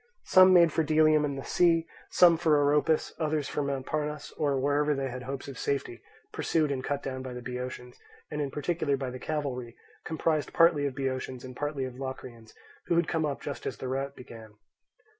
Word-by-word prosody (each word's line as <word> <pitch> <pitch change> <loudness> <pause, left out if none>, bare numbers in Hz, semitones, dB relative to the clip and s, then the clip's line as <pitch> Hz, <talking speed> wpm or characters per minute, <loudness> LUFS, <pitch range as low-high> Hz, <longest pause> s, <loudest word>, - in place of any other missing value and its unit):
Some 185 0 +7
made 170 -3 +6
for - - +2
Delium 155 0 +4
and 140 -1 -3
the 135 - -5
sea, 165 -2 +3 0.2
some 175 -2 +6
for 160 -2 +3
Oropus, 145 +2 +2
others 155 -2 0
for - - -2
Mount 140 -2 -2
Parnes, 150 -1 -3
or 140 -3 0
wherever 145 +2 +1
they 135 -1 -2
had 125 +1 -6
hopes 135 +2 -6
of 135 -3 -8
safety, 140 -4 -2 0.3
pursued 155 -3 0
and 130 -2 -3
cut 140 +1 -2
down 130 -1 -4
by 130 -1 -6
the 125 - -7
Boeotians, 125 0 -6 0.3
and 150 0 -2
in 140 - -1
particular 145 0 -1
by 130 -2 -4
the 130 - -7
cavalry, 130 -6 -4 0.3
composed 160 -1 -1
partly 165 -4 +4
of 135 - -6
Boeotians 130 -2 -3
and 130 -1 -9
partly 145 -1 -2
of 130 0 -8
Locrians, 125 -4 -8 0.3
who 170 - +2
had 170 - +2
come 160 -2 0
up 140 - -4
just 145 - -5
as - - -4
the 130 - -5
rout 135 +2 -3
began. 110 -4 -12
140 Hz, 200 wpm, -28 LUFS, 130-155 Hz, 0.3 s, Some